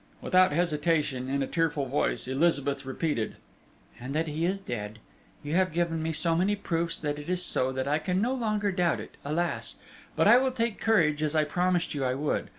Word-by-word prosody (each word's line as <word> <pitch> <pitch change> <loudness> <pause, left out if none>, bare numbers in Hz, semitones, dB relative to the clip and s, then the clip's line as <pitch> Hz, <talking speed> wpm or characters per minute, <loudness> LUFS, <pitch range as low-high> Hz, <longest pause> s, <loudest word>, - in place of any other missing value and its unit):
Without 185 -2 +4
hesitation, 150 -5 0
in 140 0 0
a - - -3
tearful 160 -4 0
voice, 135 -1 0
Elizabeth 140 -1 +1
repeated: 135 -4 -2 0.6
"And 130 +4 -6
that 160 +1 +1
he 155 +2 -1
is 190 +3 0
dead. 110 - -5 0.5
You 145 +1 -4
have 185 +1 +2
given 165 0 -1
me 160 +1 -1
so 165 +1 +1
many 190 +5 +2
proofs 170 -4 -2
that 145 -1 -2
it 145 - -8
is 180 0 0
so, 130 +1 +1
that 130 +1 -2
I 150 +2 +2
can 180 +3 -1
no 240 +5 +1
longer 215 -5 0
doubt 180 -3 +1
it, - - -9
alas! 165 +5 -2 0.4
But - - +3
I 245 - +8
will 260 0 0
take 230 -3 -2
courage, 160 -9 +3
as 155 0 -1
I 155 - +4
promised 180 +3 0
you 140 -2 -2
I 130 0 0
would. 145 +2 -2
160 Hz, 205 wpm, -28 LUFS, 145-180 Hz, 0.6 s, I